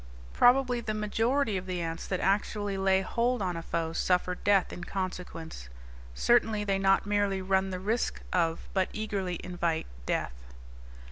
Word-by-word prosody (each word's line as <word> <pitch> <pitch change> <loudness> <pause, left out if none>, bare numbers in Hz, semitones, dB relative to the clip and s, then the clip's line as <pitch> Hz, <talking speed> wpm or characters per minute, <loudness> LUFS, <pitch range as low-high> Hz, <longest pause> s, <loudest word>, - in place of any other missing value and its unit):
Probably 245 -1 +4
the 215 -2 -3
majority 225 +2 +1
of 185 0 -6
the 180 -1 -2
ants 165 -1 -4
that 185 - -1
actually 205 0 0
lay 190 0 +3
hold 240 +5 0
on 185 -3 -1
a 165 - -4
foe 165 -1 -2
suffer 180 +1 +1
death 195 +1 +2
in 175 - -7
consequence; 175 - -5 0.5
certainly 220 - +3
they 195 -1 0
not 195 0 +3
merely 205 -1 +1
run 190 0 +1
the 185 -1 -4
risk 220 +5 -1
of 165 -2 0
but 190 -1 +1
eagerly 195 -5 -3
invite 175 -3 -1 0.2
death. - - -3
195 Hz, 155 wpm, -29 LUFS, 180-210 Hz, 0.5 s, Probably